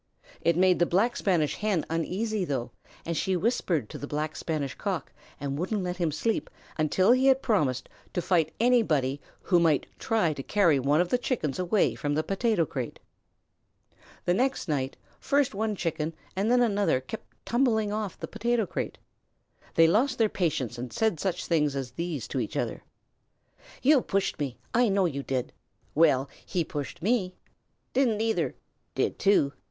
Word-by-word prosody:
It 170 Hz, 0 st, +2 dB
made 185 Hz, 0 st, +4 dB
the 175 Hz, -, +3 dB
Black 210 Hz, +7 st, +2 dB
Spanish 170 Hz, -7 st, +1 dB
Hen 210 Hz, -6 st, 0 dB
uneasy 190 Hz, +6 st, -1 dB
though, 130 Hz, -7 st, -2 dB, 0.3 s
and 170 Hz, -, -2 dB
she 190 Hz, +3 st, 0 dB
whispered 175 Hz, -, 0 dB
to -, -, -7 dB
the 145 Hz, -, -5 dB
Black 150 Hz, +1 st, -3 dB
Spanish 150 Hz, -5 st, -2 dB
Cock -, -, -4 dB, 0.3 s
and 140 Hz, 0 st, -3 dB
wouldn't 190 Hz, +3 st, -1 dB
let 180 Hz, 0 st, -3 dB
him 170 Hz, -3 st, 0 dB
sleep 225 Hz, +9 st, -1 dB, 0.3 s
until 175 Hz, +7 st, +3 dB
he 255 Hz, +2 st, +4 dB
had 265 Hz, 0 st, +4 dB
promised 145 Hz, -, +1 dB, 0.3 s
to -, -, +2 dB
fight 170 Hz, -4 st, +2 dB
anybody 160 Hz, -, +2 dB, 0.2 s
who 175 Hz, -3 st, +3 dB
might 160 Hz, -4 st, +3 dB
try 215 Hz, -9 st, +1 dB
to 140 Hz, -, -6 dB
carry 170 Hz, -3 st, +3 dB
one 145 Hz, +5 st, +3 dB
of 175 Hz, -, -1 dB
the 250 Hz, -, +2 dB
Chickens 185 Hz, -, -2 dB
away 185 Hz, +3 st, +2 dB
from 145 Hz, -1 st, -2 dB
the 155 Hz, -, +1 dB
potato 195 Hz, -2 st, +1 dB
crate. 130 Hz, -5 st, -5 dB, 1.3 s
The 175 Hz, -, +3 dB
next 260 Hz, +3 st, 0 dB
night 135 Hz, -4 st, -1 dB, 0.2 s
first 280 Hz, -3 st, +1 dB
one 215 Hz, +1 st, -1 dB
Chicken 165 Hz, -3 st, -2 dB, 0.2 s
and 200 Hz, +4 st, 0 dB
then 245 Hz, 0 st, +5 dB
another 205 Hz, -, +2 dB
kept 210 Hz, +12 st, -9 dB
tumbling 225 Hz, -4 st, +2 dB
off 210 Hz, -3 st, -3 dB
the -, -, -5 dB
potato 230 Hz, +1 st, 0 dB
crate. -, -, -4 dB, 0.8 s
They 165 Hz, -, +7 dB
lost 240 Hz, +10 st, +3 dB
their 225 Hz, -2 st, +3 dB
patience 135 Hz, -, -1 dB
and 125 Hz, 0 st, -5 dB
said 220 Hz, -8 st, 0 dB
such 180 Hz, +1 st, -2 dB
things 150 Hz, -4 st, +1 dB
as 135 Hz, -3 st, -3 dB
these 165 Hz, -2 st, -4 dB
to 135 Hz, -, -2 dB
each 110 Hz, -, -3 dB
other: -, -, -2 dB, 1.0 s
"You 280 Hz, -1 st, +6 dB
pushed 195 Hz, -5 st, -1 dB
me! 135 Hz, -4 st, -3 dB, 0.2 s
You 240 Hz, -1 st, +4 dB
know 195 Hz, -1 st, +3 dB
you 140 Hz, -5 st, -1 dB
did!" 130 Hz, -2 st, -3 dB, 0.4 s
"Well, 140 Hz, -4 st, +4 dB, 0.2 s
he 180 Hz, -3 st, -1 dB
pushed 145 Hz, +1 st, -6 dB
me!" 200 Hz, -4 st, +1 dB, 0.6 s
"Didn't 250 Hz, -5 st, +2 dB
either!" 225 Hz, 0 st, 0 dB, 0.4 s
"Did -, -, 0 dB
too!" 195 Hz, -8 st, +3 dB
180 Hz, 170 wpm, -28 LUFS, 150-220 Hz, 1.3 s, They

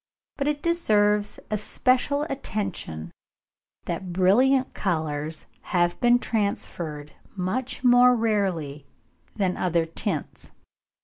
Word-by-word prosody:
But 280 Hz, -, -1 dB
it 295 Hz, -1 st, -1 dB
deserves 210 Hz, -11 st, +2 dB
especial 255 Hz, +6 st, +1 dB
attention 195 Hz, -, -4 dB, 0.7 s
that 175 Hz, +1 st, -4 dB
brilliant 250 Hz, +9 st, +3 dB
colours 155 Hz, -4 st, -2 dB, 0.3 s
have 175 Hz, 0 st, +2 dB
been 240 Hz, -1 st, +5 dB
transferred 170 Hz, -10 st, -3 dB, 0.3 s
much 240 Hz, +9 st, -3 dB
more 250 Hz, 0 st, +6 dB
rarely 185 Hz, -, -1 dB, 0.5 s
than 190 Hz, -4 st, 0 dB
other 170 Hz, -2 st, +1 dB
tints. 165 Hz, -1 st, -4 dB
205 Hz, 90 wpm, -25 LUFS, 170-245 Hz, 0.7 s, more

